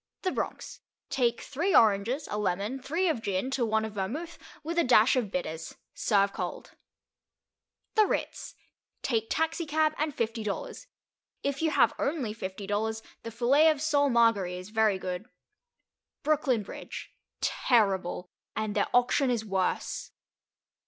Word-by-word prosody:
The 370 - +1
Bronx. - - -4 0.3
Take 240 -3 +1
three 340 +8 0
oranges, 225 +7 +3
a - - -1
lemon, 210 +6 -1
three 330 +8 0
of 310 -9 0
gin, 200 +4 -1
to 265 -2 0
one 220 -1 +1
of 220 - -6
vermouth, 275 - -4 0.2
with 335 +3 -1
a - - +4
dash 245 -1 +5
of 240 -6 0
bitters. 160 -4 -4 0.2
Serve 200 -2 +2
cold. - - -5 1.2
The 430 -2 +5
Ritz. - - -3 0.5
Take 225 -3 0
taxicab 315 -1 +1
and 300 -2 -1
fifty 225 -1 -2
dollars. 210 - -5 0.6
If 280 +1 -1
you 320 - +3
have - - +4
only 275 -7 -1
fifty 195 -1 -6
dollars 220 +2 -1 0.2
the 230 - -6
filet 255 +7 +4
of 305 -2 +1
sole 285 -2 +2
Marguéry 225 -7 +3
is 185 +2 -9
very 220 -3 +3
good. 185 +4 -5 0.9
Brooklyn 280 -7 +2
Bridge. - - -8 0.3
Terrible. 195 -7 +1 0.3
And 215 -1 -2
their - - +2
auction 250 +2 +3
is 235 -3 0
worse. 190 -3 -2
230 Hz, 145 wpm, -29 LUFS, 205-285 Hz, 1.2 s, dash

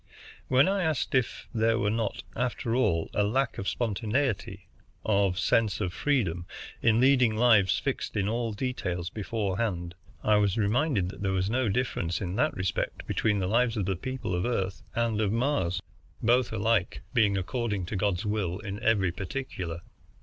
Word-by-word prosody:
When 130 +4 +5
I 195 0 +1
asked 160 -5 0
if 130 -3 0
there 115 0 +2
were 105 -3 +1
not, 110 -2 -2
after 125 0 -1
all, 100 -10 +1
a - - +2
lack 130 +5 0
of 100 - -4
spontaneity, 110 -3 -1 0.4
of 100 -3 +2
sense 110 +1 +2
of 95 -4 -2
freedom, 95 - 0 0.3
in 115 0 +4
leading 130 -3 +4
lives 110 -5 +4
fixed - - -3
in 100 -1 +1
all 115 +1 -1
details 100 -7 -3
beforehand, 100 -4 -2 0.3
I 105 -1 +4
was 100 -1 +2
reminded 110 - +1
that 95 - -9
there 95 -1 0
was 95 +2 0
no 125 -1 +1
difference 95 -7 -1
in 90 -1 -3
that - - +1
respect 95 0 -2
between 105 -1 +1
the 95 - 0
lives 115 +2 +2
of 100 - 0
the 95 0 0
people 130 +1 -4
of 90 0 0
Earth 95 -6 -1
and 115 -2 +1
of 105 -2 +1
Mars, 115 - 0 0.4
both 120 +2 +3
alike 110 -2 0
being 105 -5 +3
according 105 0 -2
to 90 - -5
God's 95 -2 0
will 105 -4 -1
in 105 -1 -6
every 100 -5 +2
particular. 90 -5 -5
105 Hz, 170 wpm, -28 LUFS, 95-120 Hz, 0.4 s, When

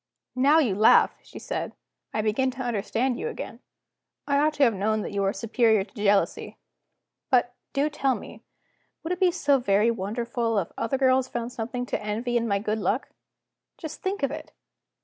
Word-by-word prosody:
"Now 275 +5 +5
you 265 -11 +3
laugh," 215 +3 +5
she - - -13
said, - - -4 0.4
"I 215 - -1
begin 225 +5 +1
to 260 0 -5
understand 240 +2 -1
you - - -3
again; 465 - -7 0.7
I 280 -1 +2
ought 305 +1 +2
to 290 - +3
have 235 -4 +5
known 215 +2 0
that - - -5
you 200 -1 -1
are 195 - +2
superior 220 0 +2
to 195 - -19
jealousy. 205 -2 0 0.7
But, 245 -1 +3 0.2
do 280 +2 +1
tell 275 -3 0
me, - - -10 0.6
would 330 +3 -1
it 360 - -5
be 370 -2 +5
so 290 -6 +2
very 210 -1 +3
wonderful 230 +2 -2
if 185 -4 -1
other 265 +4 -1
girls 260 -1 +3
found 240 -1 -4
something 245 +1 -4
to - - -3
envy 225 +4 -2
in 235 -1 +1
my 200 -2 +1
good 215 +2 -2
luck? 225 +5 -1 0.7
Just 315 -2 -8
think 380 -4 -3
of 275 - +1
it! - - -8
240 Hz, 190 wpm, -26 LUFS, 215-270 Hz, 0.7 s, Now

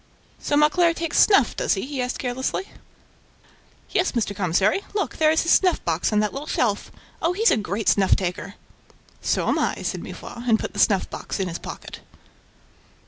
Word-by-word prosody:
"So 290 - 0
Mauclair 330 +3 +3
takes 335 -1 -1
snuff, 340 - +5
does - - +1
he?" 195 - -4
he 275 -1 -4
asked 250 0 -2
carelessly. 260 +9 -3 1.2
"'Yes, 370 - +1
Mr. 220 -4 -1
Commissary... 190 - +1
Look, 400 - -2
there 310 -1 +4
is 320 +1 +2
his 335 - +1
snuff 365 -3 +3
box 165 +4 0
on 210 - +2
that 210 - -1
little 285 +3 -6
shelf... 210 -4 -1 0.3
Oh! 335 +2 +1
he's 445 +5 +3
a - - +4
great 210 0 -3
snuff 195 -2 +4
taker!" 185 +1 -4 0.7
"So - - 0
am - - +1
I," - - 0
said - - -3
Mifroid 240 +1 -7
and 220 -1 +4
put - - -5
the - - -5
snuff 195 -4 +3
box - - -5
in 190 - -1
his 170 -1 -5
pocket. - - -9
245 Hz, 190 wpm, -23 LUFS, 200-320 Hz, 1.2 s, snuff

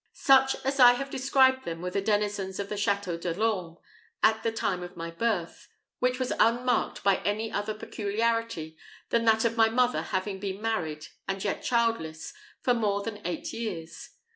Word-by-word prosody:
Such 265 -1 +4
as 275 +1 -1
I 245 -1 +9
have 275 +2 -4
described 260 0 +3
them 165 -5 -5
were 180 +1 -4
the 200 - 0
denizens 205 -2 -1
of 200 0 -4
the 210 - -3
Château 200 -4 -1
de 170 -1 -2
l'Orme 185 -6 -1 0.5
at 220 0 +4
the 230 0 0
time 190 -5 -1
of 180 0 -9
my 165 0 -5
birth, 185 -2 -2 0.3
which 250 0 +1
was 255 -1 -1
unmarked 245 +2 +2
by 195 -1 +4
any 215 +2 -2
other 210 +1 -2
peculiarity 215 -6 -2 0.4
than 230 0 +2
that 220 0 +4
of 230 0 0
my 225 0 +5
mother 250 +2 +2
having 190 +1 -3
been 195 0 -4
married, 160 -9 -2 0.2
and 195 0 -3
yet 205 - -2
childless, 225 -10 -1 0.3
for 250 - +3
more 205 -4 0
than 210 -1 -6
eight 175 -2 -4
years. 175 -8 -6
210 Hz, 180 wpm, -28 LUFS, 190-230 Hz, 0.5 s, I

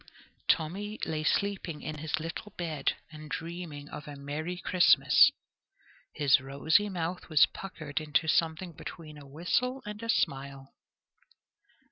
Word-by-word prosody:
Tommy 200 +7 0
lay 155 -1 -2
sleeping 190 -3 -1
in 155 -1 -5
his 160 +1 -1
little 165 +6 -6
bed 160 -5 -1 0.2
and 155 -1 -10
dreaming 165 -4 -6
of 150 - -8
a 145 - -7
merry 150 +5 -4
Christmas. 180 0 +6 0.9
His 145 -2 +5
rosy 160 +9 +2
mouth 175 -1 -4
was 155 -3 +7
puckered 155 -6 -6
into 155 +1 +1
something 165 +2 +1
between 155 -1 -9
a 140 - -13
whistle 235 - -1
and 210 +1 -6
a 230 - -6
smile. 135 -7 -1
160 Hz, 130 wpm, -30 LUFS, 150-180 Hz, 0.9 s, was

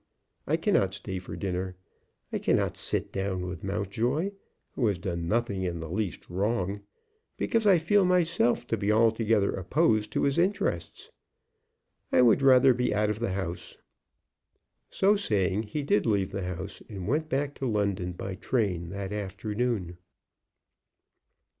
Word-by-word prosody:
I - - +2
cannot 95 0 +1
stay 95 -1 -5
for 90 - -8
dinner. 95 -1 -3 0.6
I - - 0
cannot - - +1
sit - - -1
down 95 -2 -2
with 90 -2 -7
Mountjoy, 110 - -1 0.4
who 120 - 0
has 100 -3 +1
done 85 -2 -3
nothing 105 -2 0
in 90 -2 -2
the 80 0 -6
least 100 -1 -3
wrong, 100 +1 -1 0.6
because 225 -2 +1
I 190 -3 +7
feel 195 +5 +3
myself 170 -10 +2
to 115 - +1
be 100 0 0
altogether 110 -2 +3
opposed 110 - +1
to - - +1
his 140 +3 +2
interests. 170 - -1 1.0
I 125 - +5
would 120 +3 +5
rather 130 -1 +6
be 125 +1 0
out 105 0 +2
of 105 - -4
the 115 -5 -1
house." 95 -3 -5 1.1
So 200 +2 +3
saying 105 - 0
he 150 +5 -2
did 175 -1 +2
leave 100 -3 +1
the 95 -2 -3
house, 90 +2 -6
and 100 -4 -6
went 155 +6 0
back 140 +1 -1
to 135 - -1
London 100 -5 -1
by 95 +2 -5
train 95 -5 -1
that 100 +1 -5
afternoon. 105 -2 -3
105 Hz, 150 wpm, -28 LUFS, 95-125 Hz, 1.1 s, I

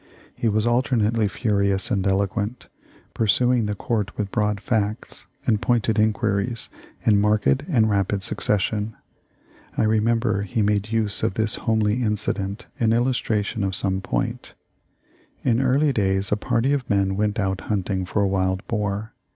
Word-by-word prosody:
He 115 - 0
was 110 +1 +1
alternately 115 -3 +2
furious 100 0 0
and 100 -3 +1
eloquent, 100 +4 -1 0.4
pursuing 120 +1 +2
the 105 - -2
Court 105 -1 -2
with 100 -2 -2
broad 105 -2 0
facts 105 0 -2 0.2
and 110 -4 +2
pointed 115 -3 +1
inquiries 110 +1 0 0.4
in 105 -2 +4
marked 105 0 +2 0.2
and 115 -9 +3
rapid 100 -1 0
succession. 105 +2 -1 0.8
I - - +3
remember 110 0 +2
he 105 +2 -1
made 105 +1 0
use 110 -3 0
of 95 - 0
this 110 -1 +1 0.2
homely 110 +1 +2
incident 105 -1 -1
in 115 -1 +3
illustration 115 -3 0
of 95 -1 -1
some 95 0 -1
point: - - -3 0.9
"In 120 -1 +2
early 135 +2 +2
days 95 -3 0
a - - +4
party 115 +6 0
of 135 -4 -2
men 95 -1 +1
went 105 +1 0
out 95 -1 -1
hunting 95 -2 -1
for 100 +3 0
a - - +2
wild 95 0 0
boar. 105 -1 -2
105 Hz, 150 wpm, -23 LUFS, 100-115 Hz, 0.9 s, in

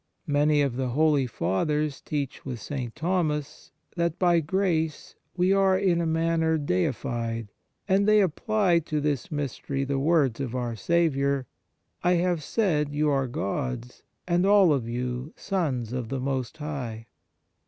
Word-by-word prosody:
1 145 - -3
Many 145 +1 +4
of 130 -3 -1
the 130 -1 -1
holy 145 +1 +2
Fathers 145 - -1
teach 145 -3 -4
with 125 -3 -5
St. 125 -1 -5
Thomas 155 -4 -2 0.3
that 170 -1 0
by 175 -2 +4
grace 160 -2 -1 0.2
we 180 +2 +3
are 195 -1 +4
in 185 -3 +2
a 165 - 0
manner 160 0 +1
deified, 115 - -2 0.4
and 200 +1 +3
they 215 0 +6
apply 195 0 +2
to 155 -1 -2
this 145 -3 -2
mystery 140 -1 -3
the 135 0 -1
words 140 -5 +2
of 130 -3 -3
our 120 -2 -2
Saviour: 140 -2 +1 0.3
" - - -43
I 180 +1 +4
have 175 -1 +1
said 150 -7 0
you 150 0 +2
are 135 -2 +1
gods, 125 +2 -4 0.3
and 175 0 +2
all 195 -4 +6
of 120 -5 -2
you 125 +3 -3
sons 135 - -2
of 125 -3 -3
the 135 0 -2
most 130 +1 -2
High." 130 -7 -5
150 Hz, 155 wpm, -26 LUFS, 130-170 Hz, 0.4 s, they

